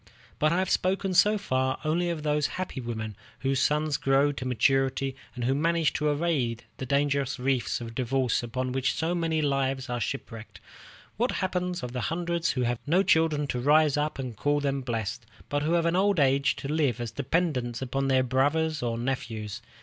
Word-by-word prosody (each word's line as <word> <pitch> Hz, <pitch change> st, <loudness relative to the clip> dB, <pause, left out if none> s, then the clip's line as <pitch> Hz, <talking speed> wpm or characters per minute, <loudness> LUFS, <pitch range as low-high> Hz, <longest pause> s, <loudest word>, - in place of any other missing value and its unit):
But 155 Hz, 0 st, +3 dB
I 170 Hz, -, +2 dB
have 185 Hz, 0 st, 0 dB
spoken 190 Hz, +1 st, +1 dB
so 205 Hz, +4 st, +5 dB
far 130 Hz, -9 st, 0 dB
only 170 Hz, +3 st, +1 dB
of 165 Hz, -3 st, -3 dB
those 150 Hz, -1 st, +1 dB
happy 185 Hz, -7 st, -4 dB
women 110 Hz, -3 st, -5 dB, 0.3 s
whose 135 Hz, -1 st, +1 dB
sons 150 Hz, 0 st, +1 dB
grow 135 Hz, +1 st, +3 dB
to 130 Hz, -2 st, -5 dB
maturity, 135 Hz, +2 st, +1 dB, 0.2 s
and 125 Hz, -, -4 dB
who 130 Hz, +3 st, +2 dB
manage 165 Hz, +2 st, +1 dB
to 150 Hz, -, 0 dB
evade 145 Hz, -7 st, 0 dB
the 130 Hz, -, -5 dB
dangerous 140 Hz, 0 st, +1 dB
reefs 130 Hz, -1 st, 0 dB
of 115 Hz, -1 st, -7 dB
divorce 130 Hz, 0 st, 0 dB
upon 125 Hz, +2 st, -3 dB
which 130 Hz, 0 st, 0 dB
so 165 Hz, +2 st, 0 dB
many 165 Hz, -3 st, 0 dB
lives 135 Hz, -2 st, 0 dB
are 120 Hz, -, -1 dB
shipwrecked. 115 Hz, -3 st, -5 dB, 0.6 s
What 240 Hz, +4 st, 0 dB
becomes 180 Hz, -1 st, -2 dB
of 125 Hz, -, -4 dB
the 125 Hz, 0 st, -3 dB
hundreds 170 Hz, 0 st, -1 dB
who 125 Hz, -, 0 dB
have 120 Hz, -1 st, 0 dB
no 180 Hz, +6 st, +4 dB
children 160 Hz, -4 st, +3 dB
to 125 Hz, -, -1 dB
rise 150 Hz, +2 st, +4 dB
up 150 Hz, +1 st, -1 dB
and 130 Hz, -4 st, -5 dB
call 145 Hz, +6 st, +1 dB
them 140 Hz, -1 st, -1 dB
blessed, 115 Hz, -2 st, -3 dB, 0.3 s
but 145 Hz, 0 st, 0 dB
who 155 Hz, +3 st, 0 dB
have 170 Hz, -1 st, +2 dB
in 170 Hz, +1 st, +2 dB
old 195 Hz, -1 st, +3 dB
age 140 Hz, 0 st, +3 dB
to -, -, -6 dB
live 145 Hz, -5 st, +1 dB
as 120 Hz, -2 st, -4 dB
dependents 130 Hz, -2 st, -1 dB
upon 135 Hz, +1 st, -1 dB
their 130 Hz, -1 st, +3 dB
brothers 145 Hz, +5 st, +1 dB
or 115 Hz, -1 st, -1 dB
nephews? 115 Hz, -3 st, -3 dB
140 Hz, 195 wpm, -27 LUFS, 125-160 Hz, 0.6 s, so